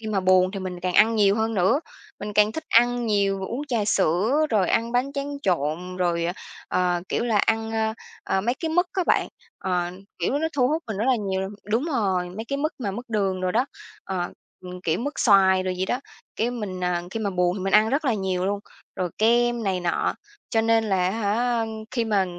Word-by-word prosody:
khi 220 Hz, -, -8 dB
mà 210 Hz, -3 st, 0 dB
buồn 185 Hz, 0 st, +4 dB
thì 195 Hz, 0 st, -5 dB
mình 180 Hz, -1 st, -5 dB
càng 180 Hz, 0 st, -2 dB
ăn 225 Hz, +2 st, +5 dB
nhiều 200 Hz, -2 st, +4 dB
hơn 225 Hz, 0 st, 0 dB
nữa, 190 Hz, +9 st, +3 dB, 0.4 s
mình 210 Hz, -, -5 dB
càng 210 Hz, +1 st, +4 dB
thích 320 Hz, -, -5 dB
ăn 240 Hz, +1 st, +3 dB
nhiều, 200 Hz, -2 st, +1 dB
uống 280 Hz, +5 st, -4 dB
trà 235 Hz, -5 st, 0 dB
sữa, 205 Hz, -, +2 dB
rồi 205 Hz, -5 st, +2 dB
ăn 230 Hz, +1 st, +1 dB
bánh 250 Hz, +3 st, +1 dB
tráng 285 Hz, 0 st, -4 dB
trộn, 175 Hz, +1 st, -1 dB
rồi, 175 Hz, -2 st, 0 dB
ờ, 175 Hz, -, 0 dB, 0.4 s
ờ, 180 Hz, -1 st, +1 dB
kiểu -, -, 0 dB
là, 225 Hz, -3 st, +2 dB
ăn, 225 Hz, +2 st, +1 dB
ơ, 220 Hz, 0 st, 0 dB, 0.3 s
ờ, 190 Hz, -, +1 dB
mấy 235 Hz, +5 st, 0 dB
cái 325 Hz, -, -1 dB
mứt 355 Hz, +3 st, +2 dB
á 370 Hz, -, 0 dB
bạn. -, -, +2 dB, 0.3 s
Ờ, 180 Hz, -2 st, 0 dB, 0.3 s
kiểu, 185 Hz, +11 st, 0 dB
nó 320 Hz, +1 st, 0 dB
thu 255 Hz, -4 st, +2 dB
hút 315 Hz, +3 st, 0 dB
mình 220 Hz, -3 st, -4 dB
rất 210 Hz, -, -1 dB
là 260 Hz, -, +4 dB
nhiều 195 Hz, -3 st, -2 dB
l -, -, -10 dB, 0.2 s
đúng 230 Hz, +6 st, +2 dB
rồi, 195 Hz, -, 0 dB
mấy 215 Hz, +5 st, -6 dB
cái 275 Hz, -, -1 dB
mứt 305 Hz, +3 st, -1 dB
mà 220 Hz, -6 st, -2 dB
mứt 235 Hz, +6 st, -6 dB
đường 195 Hz, -4 st, 0 dB
đồ 185 Hz, 0 st, 0 dB
đó, 240 Hz, +7 st, +1 dB, 0.4 s
ờ, 180 Hz, -2 st, -2 dB, 0.3 s
ừm, 180 Hz, 0 st, -8 dB
kiểu 165 Hz, -1 st, 0 dB
mứt 285 Hz, +6 st, -3 dB
xoài 190 Hz, -3 st, +5 dB
đồ 185 Hz, -, -2 dB
gì 185 Hz, 0 st, -1 dB
đó. 245 Hz, -, -1 dB, 0.4 s
Cái 230 Hz, +2 st, 0 dB
mình, 210 Hz, -7 st, -5 dB
ờ, 180 Hz, -1 st, 0 dB
khi 225 Hz, -, -4 dB
mà 205 Hz, -2 st, -1 dB
buồn 180 Hz, 0 st, +1 dB
thì 190 Hz, -, -4 dB
mình 195 Hz, -, -1 dB
ăn 215 Hz, +1 st, +6 dB
rất 280 Hz, +6 st, 0 dB
là 250 Hz, -5 st, +2 dB
nhiều 190 Hz, -2 st, -1 dB
luôn, 200 Hz, 0 st, -1 dB, 0.4 s
rồi 180 Hz, -2 st, -2 dB
kem 240 Hz, +1 st, +3 dB
này 190 Hz, -3 st, 0 dB
nọ, 175 Hz, -1 st, 0 dB, 0.4 s
cho 225 Hz, -, +3 dB
nên 225 Hz, 0 st, +3 dB
là 195 Hz, -3 st, +1 dB
á -, -, 0 dB
hả, 230 Hz, +3 st, 0 dB
ơm, 225 Hz, -, -2 dB, 0.2 s
khi 235 Hz, -2 st, 0 dB
mà 205 Hz, -4 st, +2 dB
210 Hz, 240 wpm, -24 LUFS, 185-235 Hz, 0.4 s, ăn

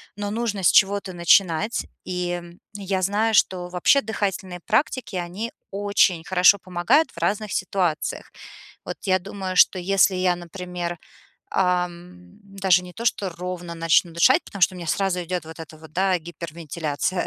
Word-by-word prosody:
но 205 Hz, 0 st, -4 dB
нужно 215 Hz, -3 st, -2 dB
с -, -, +6 dB
чего-то 200 Hz, -1 st, +3 dB
начинать. 175 Hz, +3 st, +2 dB, 0.2 s
И, 180 Hz, -1 st, -2 dB
м, 175 Hz, 0 st, -7 dB
я 195 Hz, -2 st, -2 dB
знаю, 210 Hz, +4 st, +1 dB
что 185 Hz, -3 st, +2 dB
вообще 180 Hz, +10 st, +3 dB
дыхательные 195 Hz, -5 st, -3 dB
практики- 235 Hz, -1 st, 0 dB
они 180 Hz, +7 st, -4 dB, 0.2 s
очень 200 Hz, -4 st, +2 dB
хорошо 185 Hz, +3 st, +5 dB
помогают 185 Hz, -, +1 dB
в -, -, -24 dB
разных 200 Hz, +5 st, -1 dB
ситуациях. 180 Hz, -4 st, -2 dB, 0.5 s
Вот -, -, -5 dB
я 185 Hz, -2 st, +2 dB
думаю, 190 Hz, 0 st, -6 dB
что 185 Hz, -, +6 dB
если 190 Hz, +1 st, +3 dB
я, 185 Hz, -1 st, +1 dB
например, 175 Hz, 0 st, -6 dB, 0.6 s
эм, 180 Hz, +1 st, -2 dB
даже 195 Hz, -2 st, +1 dB
не 180 Hz, 0 st, -11 dB
то 230 Hz, +5 st, -5 dB
что 200 Hz, -4 st, 0 dB
ровно 175 Hz, 0 st, -6 dB
начну 165 Hz, +1 st, +2 dB
дышать, 255 Hz, -, +4 dB
потому 200 Hz, -, -10 dB
что 185 Hz, +1 st, +4 dB
у -, -, -9 dB
меня 175 Hz, -2 st, -7 dB
сразу 180 Hz, +2 st, 0 dB
идет 175 Hz, -2 st, -4 dB
вот 160 Hz, 0 st, -10 dB
эта 160 Hz, -1 st, -10 dB
вот, 160 Hz, -1 st, -15 dB
да, 185 Hz, +1 st, +1 dB
гипервентиляция 165 Hz, 0 st, -4 dB
180 Hz, 160 wpm, -23 LUFS, 175-200 Hz, 0.6 s, с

